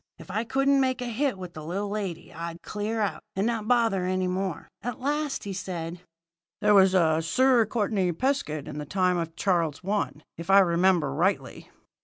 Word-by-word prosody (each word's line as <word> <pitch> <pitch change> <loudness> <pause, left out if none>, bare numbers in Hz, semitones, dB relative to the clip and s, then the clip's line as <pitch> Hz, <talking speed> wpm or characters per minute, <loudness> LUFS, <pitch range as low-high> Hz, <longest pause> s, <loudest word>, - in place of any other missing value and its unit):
If - - -11
I 215 +4 0
couldn't 270 +2 +3
make 260 -1 +1
a - - -4
hit 245 0 -1
with 180 -2 -8
the 155 - -8
little 195 +6 -3
lady, 200 -5 -4
I'd 170 0 -7
clear 215 +2 -3
out, 205 - -1
and 195 +2 0
not 225 -2 -1
bother 225 -6 +2
any 185 0 0
more. 185 0 -3
At 245 -2 -4
last 295 +2 -1
he 200 - -4
says: 175 -2 -5 0.6
"'There 210 0 +4
was 190 -1 +6
a 160 -3 +3
Sir 240 +7 +3
Courtenay 205 -5 0
Pescud 165 - -1
in 150 - -6
the 150 - -5
time 180 -1 +1
of 165 -1 -4
Charles 170 -6 0
I, 205 0 +1 0.3
if 170 - -7
I 195 - +7
remember 175 -5 +3
rightly.' 180 +7 -1
195 Hz, 190 wpm, -27 LUFS, 170-225 Hz, 0.6 s, I